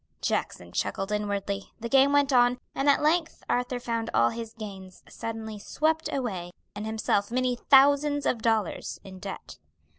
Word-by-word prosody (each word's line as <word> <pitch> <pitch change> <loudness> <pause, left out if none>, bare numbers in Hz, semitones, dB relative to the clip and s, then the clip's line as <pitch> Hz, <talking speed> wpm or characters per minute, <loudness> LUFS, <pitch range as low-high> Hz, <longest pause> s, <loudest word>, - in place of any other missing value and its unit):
Jackson 85 0 -2
chuckled 195 - -2
inwardly, 200 -1 -2
the 235 - -4
game 270 +2 +5
went 285 -1 +3
on, 245 0 +5 0.2
and 275 +1 +1
at 285 - +4
length 325 +2 +1
Arthur 245 0 0
found 230 -1 -2
all 115 - +5
his 230 -1 -6
gains 195 -4 -9
suddenly 220 -2 -6
swept 315 +8 0
away 195 -10 -3 0.2
and 210 +1 -5
himself 215 -2 0
many 250 +1 +1
thousands 285 +2 +4
of 230 - 0
dollars 220 -5 -1
in 190 -1 -10
debt. 195 0 -8
230 Hz, 155 wpm, -27 LUFS, 205-270 Hz, 0.2 s, game